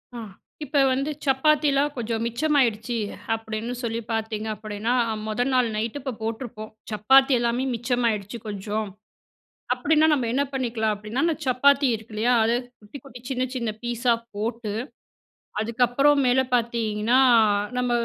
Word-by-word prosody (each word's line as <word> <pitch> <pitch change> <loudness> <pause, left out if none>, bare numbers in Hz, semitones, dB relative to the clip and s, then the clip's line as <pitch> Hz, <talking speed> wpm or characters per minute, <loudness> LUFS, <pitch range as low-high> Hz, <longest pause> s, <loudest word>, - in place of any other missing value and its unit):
ஆ. - - -5 0.5
இப்ப 285 +1 0
வந்து 275 +3 -1
சப்பாத்தில 280 +1 +3 0.2
கொஞ்சம் 230 -1 -2
மிச்சமாயிடுச்சு 240 -3 +1 0.4
அப்டின்னு 225 +2 -4
சொல்லி 230 -1 -2
பார்த்தீங்க 220 -1 -2
அப்டினா, 215 +2 -3 0.3
முதல் 245 +4 -1
நாள் 250 -2 +3
நைட் 220 +5 -2
இப்போ 265 -1 -4
போட்டுருப்போம். 220 -1 -5 0.2
சப்பாத்தி 265 +6 +5
எல்லாமே 235 +2 0
மிச்சமாயிடுச்சு 235 -3 -1
கொஞ்சம் 210 +1 -3 0.9
அப்டின்னா, 305 +5 +3
நம்ம 260 -6 +1
என்ன 275 +2 +2
பண்ணிக்கலாம் 230 -5 -1
அப்டின்னா 215 +7 -3
அந்த 335 -1 +2
சப்பாத்தி 275 +2 +4
இருக்கு 220 0 -8
இல்லையா? 235 +4 +2
அதை 230 +2 +2 0.3
குட்டி 215 +7 -11
குட்டி 250 -3 -12
சின்ன 255 -1 -1
சின்ன 235 -3 -2
பீஸா 240 0 +1 0.2
போட்டு 220 0 -3 0.9
அதுக்கப்புறம் 245 +5 +2
மேல 250 +1 +4
பார்த்தீங்கன்னா, 230 0 +1 0.6
நம்ம 250 0 0
235 Hz, 130 wpm, -24 LUFS, 220-260 Hz, 0.9 s, சப்பாத்தி